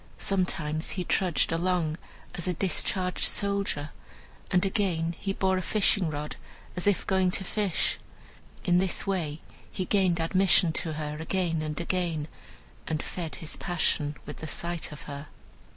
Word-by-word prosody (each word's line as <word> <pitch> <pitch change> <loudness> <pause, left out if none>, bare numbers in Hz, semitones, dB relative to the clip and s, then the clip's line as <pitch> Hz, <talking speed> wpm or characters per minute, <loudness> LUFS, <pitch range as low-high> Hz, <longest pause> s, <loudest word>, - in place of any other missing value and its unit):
Sometimes 165 -4 0
he 180 - 0
trudged 180 -1 +2
along 165 -2 +1 0.4
as 175 - -3
a 180 - +1
discharged 185 +1 0
soldier, 200 -7 +1 0.6
and 180 +1 +3
again 185 -5 +1
he 195 - -2
bore 190 -1 +2
a - - 0
fishing 200 -3 +3
rod, 150 0 -4 0.4
as 180 - 0
if 205 - +3
going 190 -1 +3
to 190 - -1
fish. 200 -1 0 0.7
In 180 -1 +5
this 190 -1 +1
way 165 -6 -1 0.3
he 185 - -2
gained 185 -3 +3
admission 180 0 +4
to 160 -1 -1
her 150 -1 -3
again 165 -1 0
and 155 +1 -3
again, 170 -3 -1 0.6
and 155 -2 -1
fed 170 -3 -4
his 160 -3 -2
passion 160 -4 0
with 150 - -7
the 160 - -6
sight 170 +1 -1
of 150 - -9
her. 145 +1 -7
175 Hz, 150 wpm, -28 LUFS, 155-190 Hz, 0.7 s, In